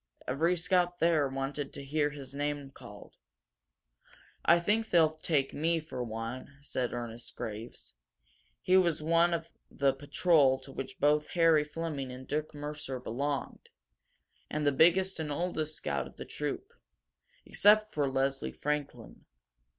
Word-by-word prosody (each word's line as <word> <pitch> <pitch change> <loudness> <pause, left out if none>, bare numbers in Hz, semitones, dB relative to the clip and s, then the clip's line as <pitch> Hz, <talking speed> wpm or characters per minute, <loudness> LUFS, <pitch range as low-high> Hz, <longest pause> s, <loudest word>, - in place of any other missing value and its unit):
Every 165 +7 +1
scout 175 0 +1
there 165 -4 +3
wanted 135 +1 -4
to 140 - -7
hear 145 +1 +1
his 140 -2 -9
name 145 -1 -3
called. 105 -6 -13 1.3
"I 170 - +6
think 215 +5 +1
they'll 160 -3 +4
take 155 -3 0
me, 165 +3 +1
for 155 -5 -5
one," 115 +4 -6
said 130 -3 -2
Ernest 120 -1 -6
Graves. 110 - -7 0.7
He 185 - +5
was 170 -5 +2
one 170 +2 +4
of 165 -1 -3 0.2
the 140 -1 +2
patrol 145 0 +3
to 135 - -10
which 135 0 -7
both 150 +1 +3
Harry 165 -3 +4
Fleming 150 -4 -4
and 130 +1 -9
Dick 150 +1 -2
Mercer 145 -3 -5
belonged, 135 +4 -3 0.8
and 150 -1 -2
the 145 - +5
biggest 175 +6 +4
and 155 -2 -3
oldest 155 -1 -2
scout 70 -1 -2
of - - -16
the - - -7
troop, - - -4 0.7
except 215 +1 +4
for 145 -2 +1
Leslie 135 +1 -1
Franklin. 150 -1 -4
150 Hz, 145 wpm, -31 LUFS, 135-165 Hz, 1.3 s, I